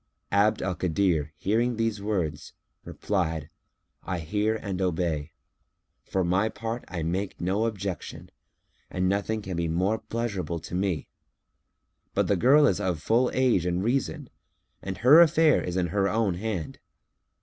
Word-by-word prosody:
Abd 100 Hz, +2 st, +3 dB
al 95 Hz, 0 st, -1 dB
Kadir 85 Hz, -4 st, 0 dB
hearing 115 Hz, +5 st, +1 dB
these 115 Hz, -2 st, -1 dB
words 90 Hz, -8 st, -3 dB, 0.3 s
replied, 80 Hz, -7 st, -2 dB, 0.5 s
"I 90 Hz, -, -3 dB
hear 105 Hz, +7 st, 0 dB
and 100 Hz, -4 st, -4 dB
obey. 80 Hz, -4 st, -1 dB, 0.7 s
For 95 Hz, -, -1 dB
my 95 Hz, +5 st, +1 dB
part, 115 Hz, +3 st, -5 dB
I 85 Hz, -4 st, -4 dB
make 90 Hz, +4 st, -3 dB
no 95 Hz, +5 st, 0 dB
objection, 100 Hz, -5 st, -5 dB, 0.6 s
and 90 Hz, 0 st, -1 dB
nothing 100 Hz, +3 st, -1 dB
can 95 Hz, -2 st, -4 dB
be 85 Hz, 0 st, -1 dB
more 95 Hz, +7 st, 0 dB
pleasurable 110 Hz, -6 st, -3 dB
to 85 Hz, -, -10 dB
me; 90 Hz, -4 st, -1 dB, 1.1 s
but -, -, +2 dB
the 100 Hz, -, +2 dB
girl 135 Hz, -, +5 dB
is 95 Hz, -, +2 dB
of 90 Hz, -4 st, -1 dB
full 120 Hz, +9 st, +2 dB
age 125 Hz, -9 st, +2 dB
and 90 Hz, +1 st, 0 dB
reason 115 Hz, -8 st, -1 dB, 0.5 s
and 95 Hz, -1 st, -5 dB
her 145 Hz, +8 st, +7 dB
affair 160 Hz, -2 st, +5 dB
is 90 Hz, 0 st, -3 dB
in 90 Hz, -2 st, 0 dB
her 100 Hz, +2 st, +1 dB
own 105 Hz, -2 st, +1 dB
hand. 95 Hz, -4 st, -4 dB
95 Hz, 150 wpm, -27 LUFS, 90-110 Hz, 1.1 s, her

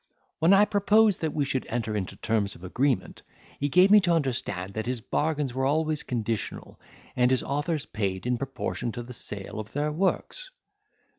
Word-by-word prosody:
When 165 Hz, +3 st, +4 dB
I 200 Hz, +1 st, +7 dB
proposed 210 Hz, 0 st, +3 dB
that 160 Hz, -2 st, 0 dB
we 145 Hz, -1 st, 0 dB
should 135 Hz, -1 st, -2 dB
enter 110 Hz, -2 st, -2 dB
into 95 Hz, -3 st, -3 dB
terms 110 Hz, -3 st, -1 dB
of 85 Hz, -, -15 dB
agreement, 125 Hz, +8 st, -1 dB, 0.4 s
he 145 Hz, -, 0 dB
gave 180 Hz, +6 st, +5 dB
me 210 Hz, -, +9 dB
to 180 Hz, -3 st, +1 dB
understand 120 Hz, -, -1 dB
that 110 Hz, +2 st, -4 dB
his 125 Hz, -1 st, -1 dB
bargains 145 Hz, +2 st, -1 dB
were 130 Hz, +1 st, 0 dB
always 155 Hz, +1 st, +1 dB
conditional, 115 Hz, -3 st, -4 dB, 0.4 s
and 125 Hz, 0 st, +3 dB
his 130 Hz, -1 st, +2 dB
authors 145 Hz, +2 st, -2 dB
paid 95 Hz, -3 st, -3 dB
in 125 Hz, -1 st, 0 dB
proportion 130 Hz, -2 st, -3 dB
to 120 Hz, -, -5 dB
the 125 Hz, +1 st, -9 dB
sale 105 Hz, -2 st, -6 dB
of 110 Hz, +1 st, -8 dB
their 150 Hz, +1 st, 0 dB
works. 195 Hz, -, -1 dB
135 Hz, 180 wpm, -27 LUFS, 115-155 Hz, 0.4 s, me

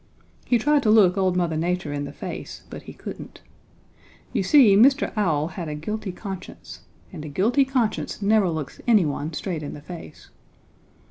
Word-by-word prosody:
He 245 Hz, -, +3 dB
tried 295 Hz, +5 st, +2 dB
to 220 Hz, -, +1 dB
look 205 Hz, -4 st, +6 dB
old 185 Hz, -2 st, +1 dB
Mother 170 Hz, -3 st, 0 dB
Nature 170 Hz, -2 st, -1 dB
in 145 Hz, 0 st, -3 dB
the -, -, -7 dB
face, -, -, -7 dB
but -, -, -7 dB
he -, -, -11 dB
couldn't. -, -, -9 dB, 0.9 s
You -, -, +1 dB
see, 215 Hz, 0 st, +6 dB
Mr. 270 Hz, +7 st, +4 dB
Owl 160 Hz, -7 st, +1 dB
had 175 Hz, -2 st, -6 dB
a 150 Hz, -, -4 dB
guilty 205 Hz, +6 st, -4 dB
conscience 190 Hz, -1 st, -9 dB, 0.3 s
and 155 Hz, -4 st, -7 dB
a 155 Hz, -, -6 dB
guilty 230 Hz, -, +2 dB
conscience 255 Hz, -5 st, -1 dB
never 205 Hz, -2 st, +3 dB
looks 160 Hz, -4 st, -5 dB
anyone 160 Hz, -9 st, +2 dB
straight 170 Hz, 0 st, -4 dB
in 145 Hz, -, -6 dB
the -, -, -9 dB
face. 165 Hz, -1 st, -11 dB
185 Hz, 175 wpm, -24 LUFS, 160-220 Hz, 0.9 s, look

